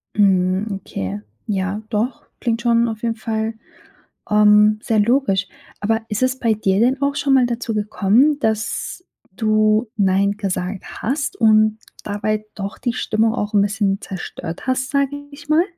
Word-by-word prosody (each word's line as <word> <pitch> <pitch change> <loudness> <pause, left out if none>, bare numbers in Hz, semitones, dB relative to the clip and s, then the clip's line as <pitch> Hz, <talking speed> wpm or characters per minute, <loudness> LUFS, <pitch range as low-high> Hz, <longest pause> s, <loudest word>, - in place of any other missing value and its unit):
Mhm, 190 0 +2
okay. 100 - -5 0.3
Ja, 195 +1 -1
doch. 230 +3 -2 0.2
Klingt 230 -1 -1
schon 235 0 +3
auf 220 -1 -5
jeden 230 -1 0
Fall, 220 0 -2 0.8
ähm, 210 0 +5
sehr 225 -3 +1
logisch. 205 -4 +2 0.3
Aber 225 +2 0
ist 210 +4 -1
es 260 +1 0
bei 230 -2 +2
dir 195 -2 +1
denn 260 +4 +2
auch 280 0 +1
schon 285 -1 +1
mal 255 -2 +5
dazu 235 -1 -3
gekommen, 215 +7 +2
dass 220 +10 -2 0.3
du 215 0 +2
nein 200 0 +2
gesagt 195 -2 -3 0.2
hast 275 +4 -1
und 215 -1 +4 0.2
dabei 215 +1 -2
doch 200 0 -5
die 240 -2 -2
Stimmung 220 -2 +1
auch 210 -3 -3
'n 205 - +5
bisschen 200 0 0
zerstört 175 +1 -7
hast, 260 0 0
sage 280 -1 +1 0.2
ich 285 0 -13
mal? 320 +3 +5
215 Hz, 155 wpm, -20 LUFS, 205-240 Hz, 0.8 s, ähm